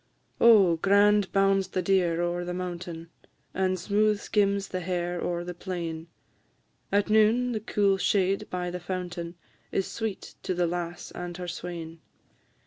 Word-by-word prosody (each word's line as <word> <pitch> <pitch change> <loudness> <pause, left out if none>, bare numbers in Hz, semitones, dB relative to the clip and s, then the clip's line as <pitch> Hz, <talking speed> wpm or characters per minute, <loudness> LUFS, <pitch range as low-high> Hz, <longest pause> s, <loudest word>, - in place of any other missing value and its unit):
"_ - - -42 0.4
Oh, 200 -8 +7
grand 200 +2 +4
bounds 195 -1 +3
the 185 - -2
deer 175 -3 +2
o'er 175 0 -1
the 180 0 -4
mountain, 175 -2 -6 0.4
And 185 0 0
smooth 210 +3 +2
skims 200 -2 +1
the 185 - -3
hare 175 0 -2
o'er 175 0 -2
the 180 0 -5
plain; 170 -3 -5 0.8
At 205 +1 +2
noon, 220 +3 +4
the 220 - -1
cool 200 -3 +1
shade 195 0 +1
by 180 -1 -3
the 180 - -4
fountain 175 -1 -5 0.4
Is 195 - 0
sweet 220 -3 -5
to 185 - -2
the 175 0 +2
lass 175 0 -4
and 175 -1 -6
her 180 -1 -6
swain. 170 -1 -6
180 Hz, 155 wpm, -27 LUFS, 175-200 Hz, 0.8 s, Oh